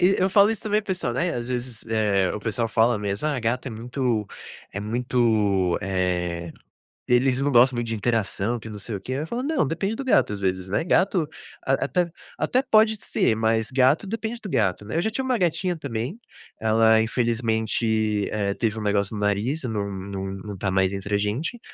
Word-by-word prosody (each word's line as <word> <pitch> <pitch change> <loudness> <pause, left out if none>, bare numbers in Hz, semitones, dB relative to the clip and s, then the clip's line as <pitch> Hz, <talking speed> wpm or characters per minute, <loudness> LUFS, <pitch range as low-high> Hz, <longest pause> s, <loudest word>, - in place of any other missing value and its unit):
e 185 +2 +4
eu 190 - +2
falo 200 +2 +6
isso 225 - -3
também 210 0 +1
para 210 - -18
o - - 0
pessoal, 130 -10 -2
né, 170 +8 0
às 120 0 -4
vezes, 125 -2 -3
eh, 105 -4 +2
o - - -3
pessoal 115 +2 -1
fala 115 +2 +3
mesmo: 100 +6 -2
"Ah, 140 -5 0
gato 120 +4 -1
é 130 - -3
muito 120 0 -1 0.5
é 100 - -4
muito, 110 -5 +1
eh, 90 -3 -1 0.6
eles 125 +1 +3
não 145 +1 +1
gostam 125 +1 +5
muito 120 -1 -2
de 115 - -1
interação, 110 0 0
que 110 - -9
não 105 -1 -7
sei 105 +1 -5
o 95 - -6
quê", 130 - -5
eu 145 +4 -3
falo: 240 +8 -3
"Não, 285 - +1
depende 195 +8 -2
do 275 - -4
gato, 255 - +3
às 105 - -4
vezes, 95 -1 -1
né, 100 - +1
gato 180 -3 +2 0.4
a 135 - +2
até 170 +6 +1 0.3
até 255 - +2
pode 220 -4 +4
ser, 115 - 0
mas 110 0 +1
gato, 130 +9 +3
depende 225 +2 -4
do 205 - -6
gato, 105 - 0
né". 110 - -5
Eu 170 - +2
já 220 - 0
tinha 260 +4 -3
uma 255 -2 +1
gatinha 175 0 0
também, 135 - -4 0.4
ela 110 0 +4
infelizmente, 110 -2 0
eh, 100 -2 0
teve 110 0 -1
um - - -4
negócio 100 0 0
no 105 - -4
nariz, 105 +10 0
num 105 -5 -2
num 95 0 -5
num 95 0 -7
tá 95 +1 -1
mais 95 0 +2
entre 100 +1 -2
a - - +4
gente, 120 - -2
115 Hz, 215 wpm, -24 LUFS, 105-150 Hz, 0.6 s, falo